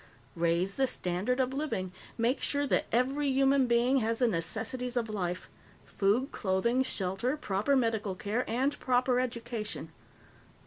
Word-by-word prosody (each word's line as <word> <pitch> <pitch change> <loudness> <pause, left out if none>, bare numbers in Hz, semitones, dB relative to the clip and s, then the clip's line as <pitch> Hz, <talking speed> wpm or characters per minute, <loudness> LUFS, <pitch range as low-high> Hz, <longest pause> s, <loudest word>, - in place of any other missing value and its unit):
Raise 170 +3 0
the 270 -1 +3
standard 200 +3 -1
of 260 0 +1
living. 270 -11 -2 0.3
Make 240 +4 +1
sure 285 0 +1
that - - +1
every 270 +5 +1
human 270 0 +3
being 240 +3 +3
has 225 -2 0
the 245 - +3
necessities 230 +7 -2
of 230 -2 -1
life 180 -3 -3 0.4
food, 215 +8 +1
clothing, 215 +6 +1
shelter, 225 +3 -1
proper 215 0 0
medical 220 -6 0
care, 210 +6 -1
and 265 +5 0
proper 250 0 +2
education. 235 -3 -4
240 Hz, 140 wpm, -30 LUFS, 200-260 Hz, 0.4 s, the